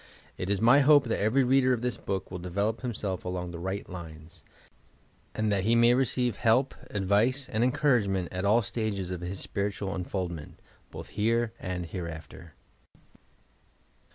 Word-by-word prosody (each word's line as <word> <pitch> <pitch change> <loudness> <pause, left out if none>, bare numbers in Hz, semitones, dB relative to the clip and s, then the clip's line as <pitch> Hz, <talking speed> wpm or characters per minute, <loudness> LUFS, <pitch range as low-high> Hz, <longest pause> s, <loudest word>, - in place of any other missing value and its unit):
It 90 - -4
is 100 -1 +1
my 120 +5 +6
hope 145 0 +6
that 115 -5 -2
every 115 +6 +3
reader 130 0 +4
of 120 -1 -2
this 125 -3 -1
book 95 -2 -4
will 90 - -5
develop 100 +6 -2
himself 105 -7 -3
along 90 -1 -4
the 85 - -7
right 95 +3 -4
lines, 80 -2 -10 0.9
and 110 -1 0
that 100 -2 +1
he 115 +3 +3
may 120 +1 +6
receive 125 -3 +1
help, 125 +6 +2 0.2
advice 105 +7 +1
and 110 +1 0
encouragement 115 - +2
at 90 0 -3
all 110 +4 +4
stages 100 -3 -3
of 90 -1 -4
his 90 +2 -5
spiritual 100 -1 -3
uu 90 - -3
foldment, 85 -5 -4 0.2
— - - -33
both - - -8
here 115 +1 0
and 90 -1 -4
hereafter! 85 -1 -8
100 Hz, 165 wpm, -28 LUFS, 90-120 Hz, 0.9 s, my